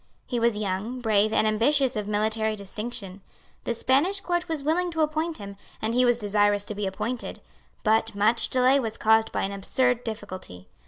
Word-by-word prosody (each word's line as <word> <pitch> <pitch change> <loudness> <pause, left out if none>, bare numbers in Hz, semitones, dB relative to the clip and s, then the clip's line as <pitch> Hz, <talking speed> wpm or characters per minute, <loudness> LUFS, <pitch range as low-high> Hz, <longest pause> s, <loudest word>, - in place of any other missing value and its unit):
He 245 - -2
was 230 -2 +2
young, 210 +5 -3
brave, 215 -2 +2
and 220 - +2
ambitious 250 +5 +2
of 210 -1 -3
military 215 +1 0
distinction. 205 -1 -5 0.4
The 235 - -1
Spanish 290 - +2
Court 350 -2 -2
was 315 -4 -3
willing 345 +4 +1
to 320 - 0
appoint 315 +2 -1
him, 200 -1 -9 0.2
and 220 +1 -2
he 250 +1 +4
was 240 -1 +3
desirous 205 -1 +1
to 210 - -4
be 205 -1 -3
appointed; 230 +6 -4 0.4
but 220 0 +2
much 215 +4 +2
delay 260 +2 +4
was 225 -4 -4
caused 220 0 +3
by - - -1
an 195 - -1
absurd 245 +5 0
difficulty. 185 - -7
220 Hz, 180 wpm, -26 LUFS, 205-255 Hz, 0.4 s, he